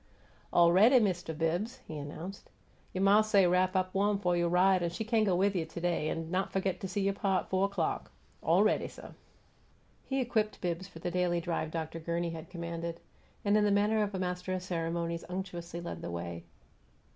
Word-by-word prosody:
"Awready, 190 +9 +6
Mist' 180 -7 -1
Bibbs," 175 +10 -1
he 160 - -6
announced. 155 +6 -7 0.4
"You' 185 - -3
ma 200 +2 +6
say 210 -3 +4
wrap 180 +1 +2
up 185 0 0
wawm 205 +1 +2
f' 180 -3 +1
you' 175 0 +2
ride, 185 +2 +4
an' 170 - 0
she 175 +6 -4
cain' 220 0 +2
go 190 -3 +2
with 195 +2 +2
you 175 - +1
to 160 +2 -8
day, 170 -3 0
an' 165 +1 -4
not 185 +1 0
f'git 190 -1 -1
go 190 - -4
see 190 +2 -2
you' 195 0 +1
pa 195 -2 +1
at - - -16
fo' 190 +1 +3
'clock. 200 - -2 0.3
Aw - - +4
ready, - - +2
suh." - - -11 0.9
He 270 0 -2
equipped 225 -4 0
Bibbs 180 +1 -3
for 195 - -13
the 175 +2 -3
daily 175 -1 +1
drive 165 -2 -2
Dr. 160 0 -4
Gurney 170 +1 -2
had 165 0 -8
commanded; 170 -1 -5 0.5
and 205 +1 +4
in 210 - +4
the 210 - +3
manner 210 +2 +3
of 205 -1 -1
a - - -2
master 180 0 -2
of 185 -1 -3
ceremonies 170 -1 -2
unctuously 180 -2 -5
led 170 - -6
the - - -5
way. 85 0 -5
180 Hz, 205 wpm, -31 LUFS, 170-195 Hz, 0.9 s, Awready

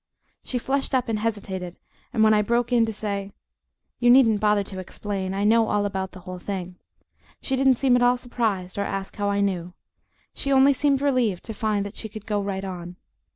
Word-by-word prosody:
She 255 - -2
flushed 270 +2 -1
up 250 -2 0
and 215 -2 0
hesitated, 195 -5 -4 0.3
and 225 -3 +2
when 215 0 +6
I 210 - +4
broke 235 +3 0
in 230 -2 +4
to - - -2
say, 200 -2 -4 0.7
"You 240 - +4
needn't 240 -4 +6
bother 210 -1 +2
to 190 -1 -8
explain, 190 0 -4
I 200 - -1
know 225 +1 +4
all 205 -1 +1
about 190 -2 -3
the 185 - -11
whole 185 0 -8
thing," 185 -2 -5 0.6
she 265 - -2
didn't 265 0 +4
seem 255 0 +3
at 245 - +2
all 245 0 +4
surprised 215 -7 -2
or - - +1
ask 195 -1 -4
how 205 -1 0
I 200 0 +1
knew 180 -3 -2 0.6
she 275 - -3
only 270 +1 +6
seemed 275 0 +1
relieved 245 -10 +1
to 220 - -6
find 210 -1 -1
that 200 - -8
she 220 - -4
could 215 -1 -9
go 210 -1 -1
right 195 -1 -3
on. 175 -2 -7
210 Hz, 210 wpm, -24 LUFS, 195-240 Hz, 0.7 s, when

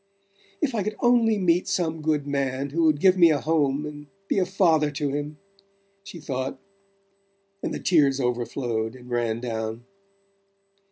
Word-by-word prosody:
"If 270 -4 +1
I 220 - 0
could 215 +2 -3
only 235 -3 +3
meet 180 -2 +2
some 160 -3 -1
good 150 -2 0
man 140 -1 -2
who 165 +2 +1
would 155 -2 +3
give 185 +2 +4
me 170 -1 +8
a 150 -2 +2
home 150 -2 0
and 145 -1 -9 0.2
be - - +1
a 185 - +1
father 165 -6 +3
to 145 0 -2
him," 145 +1 -4 0.7
she 195 -3 -10
thought 130 -2 -4 1.0
and - - -3
the - - -3
tears 140 -6 +3
overflowed 120 -2 -2
and 125 -1 -13
ran 115 -1 -1
down. 115 -1 -4
145 Hz, 160 wpm, -25 LUFS, 130-170 Hz, 1.0 s, me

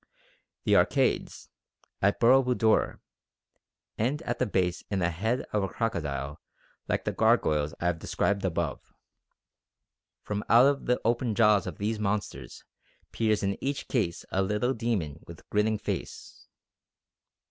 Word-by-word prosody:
The - - +3
arcades - - +1 0.5
(at - - +2
Boro 130 +3 +6
Budor) 120 -4 +2 1.0
end 135 +9 0
at - - -3
the 125 - +1
base 90 -3 0
in 100 - -1
a 85 - +1
head 110 +9 -1
of 105 - +2
a 95 - 0
crocodile 75 - -3 0.5
like - - -1
the - - 0
gargoyles 75 -1 +2
I - - -4
have 85 -2 +1
described 100 +4 -1
above. 85 -5 -1 1.4
From 105 0 -3
out 135 +4 +5
the 125 0 +1
open 120 -1 +1
jaws 105 -4 +4
of - - -6
these 105 +2 -2
monsters 100 - -3 0.5
peers 110 -2 +1
in 100 0 -2
each 140 +1 -2
case 95 -10 -1
a 95 - +1
little 105 +6 0
demon 105 - -2
with 85 - -12
grinning 105 +1 +2
face." - - -6
105 Hz, 135 wpm, -28 LUFS, 85-115 Hz, 1.4 s, Boro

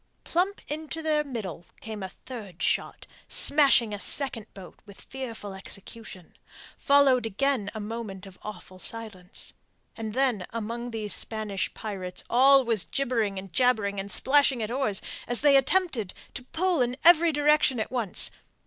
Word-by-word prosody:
Plump 375 +4 0
into 315 +2 -5
their 305 -1 +2
middle 215 - -6 0.2
came 220 -2 -7
a 190 - -4
third 205 -6 -9
shot, - - -1 0.2
smashing 270 -7 +4
a 205 - -4
second 235 -3 0
boat 190 -2 -12
with 200 -2 -15
fearful 230 -6 -7
execution. 195 -1 -6 0.4
Followed 270 -4 +4
again 225 0 0
a - - -4
moment 210 -3 -6
of 190 -2 -14
awful 195 -3 -9
silence, 205 -4 -4 0.4
then 225 -2 -1
among 230 +2 -4
those 215 -3 -1
Spanish 215 -3 -2
pirates 185 -4 -6
all 270 +2 +6
was 220 -7 0
gibbering 230 - -1
and 190 -2 -8
jabbering 215 -4 +2
and 200 +1 -5
splashing 270 -3 +3
of 215 - -4
oars, 250 -6 +1 0.2
as 240 0 +2
they 285 -1 +6
attempted 270 - +1 0.2
to 250 - -7
pull 345 +1 0
in 245 +1 0
every 340 0 +7
direction 295 -4 +3
at 220 - -3
once. 235 -7 0
230 Hz, 150 wpm, -27 LUFS, 205-275 Hz, 0.4 s, every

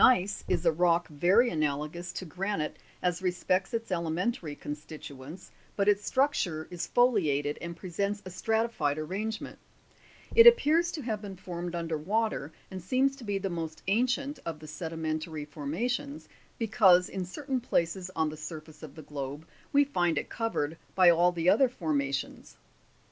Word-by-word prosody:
IS, - - +7
Gneiss 205 -5 +1
is 165 - 0
a 165 - +6
rock 170 0 +2
very 185 - +4
analogous 155 +3 -2
to 185 - -5
granite 180 -1 -3 0.2
as 180 0 0
respects 185 +2 0
its 230 -3 -3
elementary 170 -1 -1
constituents, 150 +1 -8 0.2
but 200 0 +1
its 205 0 +4
structure 205 - 0
is 175 -1 -4
foliated 155 - +2
and 170 -1 -6
presents 200 +4 -2
a 185 - -7
stratified 220 -6 0
arrangement; 200 +8 -4 0.7
it 465 0 +9
appears 345 -6 +6
to 305 - -5
have 220 -3 -2
been 200 -2 -7
formed 175 -1 -5
under 165 -2 -2
wa 215 +8 +1
ter, 145 -6 -6 0.2
and 190 -1 -6
seems 260 +9 +2
to 265 - -11
be 205 -2 -1
the 195 -1 -3
most 160 -2 -5
ancient 255 +7 +1
of 165 -2 -4
the 155 - -12
sedimentary 160 -2 -4
forma 150 +9 -3
tions, 280 +4 -3 0.3
because 200 -6 +5
in 190 - -4
certain 260 +7 -3
places 180 -3 0
on 160 -1 +1
the 155 - -8
surface 155 0 -9
of 155 -3 -10
the 155 - -9
globe 145 +1 -6 0.3
we 285 0 +6
find 175 - +1
it - - -2
covered 165 -9 -2 0.2
by 185 -2 +7
all 175 +1 +4
the 170 -1 -2
other 250 +7 +5
formations. 140 - -3
180 Hz, 165 wpm, -29 LUFS, 155-220 Hz, 0.7 s, it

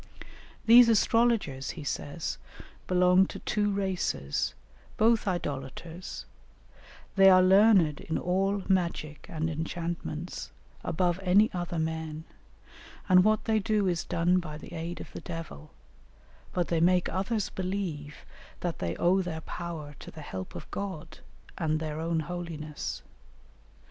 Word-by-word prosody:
"These 235 +1 +9
astrologers," 225 - +2
he 155 - -6
says, 145 +3 -4 0.5
"belong 180 +1 +5
to - - -7
two 205 -1 0
races, 185 - -1 0.4
both 225 0 +3
idolaters; 165 +1 -4 0.9
they 195 -1 +8
are 185 -1 +7
learned 190 -5 +5
in 160 - -3
all 195 +2 0
magic 170 -5 -1
and 160 -3 -2
enchantments, 165 +1 -4 0.3
above 175 +1 0
any 195 +4 +4
other 175 -1 -3
men, 160 -1 -3 0.8
and 185 -1 +7
what 215 +1 +2
they 220 -1 +2
do 210 -1 +1
is 175 -2 0
done 175 +2 +2
by 155 -4 -6
the 155 - -11
aid 170 +1 -5
of - - -9
the - - -8
devil, 165 - -7 0.8
but 175 -2 -1
they 170 - +1
make 180 +2 +3
others 200 +3 -1
believe 180 -6 -4 0.4
that 175 -4 -3
they 85 0 -2
owe 185 - +3
their 165 -3 -4
power 160 -4 -6
to - - -10
the 160 - -10
help 95 -8 -7
of - - -9
God, 165 -6 -5 0.4
and 155 -1 +1
their 155 -1 -4
own 165 0 0
holiness. 160 -3 -5
175 Hz, 135 wpm, -29 LUFS, 160-190 Hz, 0.9 s, These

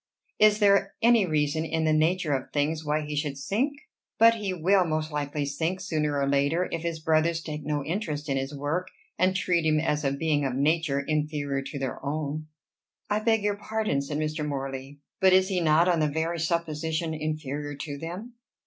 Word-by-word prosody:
Is 210 0 +6
there 200 -2 +3
any 230 -4 +5
reason 155 0 +1
in 160 0 -1
the 155 - +3
nature 160 0 +2
of 130 -1 -3
things 155 +2 0
why 150 0 0
he 150 0 -5
should 145 -2 -2
sink? 225 - 0 0.4
But 230 0 +7
he 210 -4 -3
will 185 +2 +3
most 155 -1 -2
likely 145 0 -2
sink, 160 +6 -2
sooner 155 -6 -1
or 140 - +1
later, 140 +6 +2
if 165 - -2
his 165 -1 -3
brothers 160 +1 +2
take 150 -2 -6
no 145 -1 -2
interest 160 -5 -3
in 135 - 0
his 135 +1 -2
work, 155 +6 -2 0.3
and 185 +1 +3
treat 180 -3 +1
him 155 -1 +3
as 150 -1 0
a 135 - +1
being 145 +1 0
of 130 -2 -1
nature 145 0 +1
inferior 150 -2 -1
to 140 +1 -6
their 135 -1 -4
own." 155 +1 -3 0.6
"I 210 - +2
beg 225 -1 +2
your 205 -1 0
pardon," 215 -9 -1
said 145 +1 -4
Mr. 155 0 -2
Morley, 135 -1 -5 0.2
"but 190 -2 +5
is 190 +1 +4
he 185 -2 0
not 160 +2 +4
on 175 -2 +3
the 155 - +3
very 160 +3 -2
supposition 160 0 -1
inferior 150 -2 -4
to 140 0 -6
them?" 180 - -7
155 Hz, 195 wpm, -27 LUFS, 145-175 Hz, 0.6 s, But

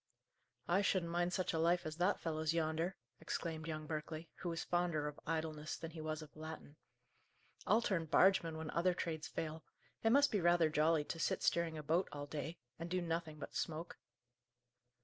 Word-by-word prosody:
"I 185 +3 +4
shouldn't 185 -4 +1
mind 175 +1 +1
such 185 0 0
a 160 - +1
life 175 +2 +3
as 155 0 -4
that 185 +3 +2
fellow's 160 0 0
yonder!" 165 +3 0 0.2
exclaimed 160 -1 -3
young 155 -1 -3
Berkeley, 155 +1 -4
who 180 - -3
was 165 -1 -2
fonder 175 -4 +1
of 150 - -6
idleness 155 -1 -2
than 165 - -6
he 160 -1 -7
was 155 0 -3
of 150 - -14
Latin. 155 -1 -8 0.9
"I'll 225 +2 +5
turn 170 -7 +1
bargeman 165 0 +4
when 160 -1 -4
other 175 +1 +2
trades 160 -2 -3
fail. 160 -1 -4 0.4
It 225 - +3
must 280 +4 +6
be 205 - +2
rather 170 -2 +4
jolly 155 0 +3
to 165 - -5
sit - - 0
steering 170 -2 +2
a 155 - -5
boat 165 +5 +2
all 145 -1 -5
day, 155 +3 -4 0.2
and 165 +1 -4
do 185 +1 +1
nothing 165 -2 -2
but - - -7
smoke." 165 +2 -3
165 Hz, 190 wpm, -38 LUFS, 155-175 Hz, 0.9 s, must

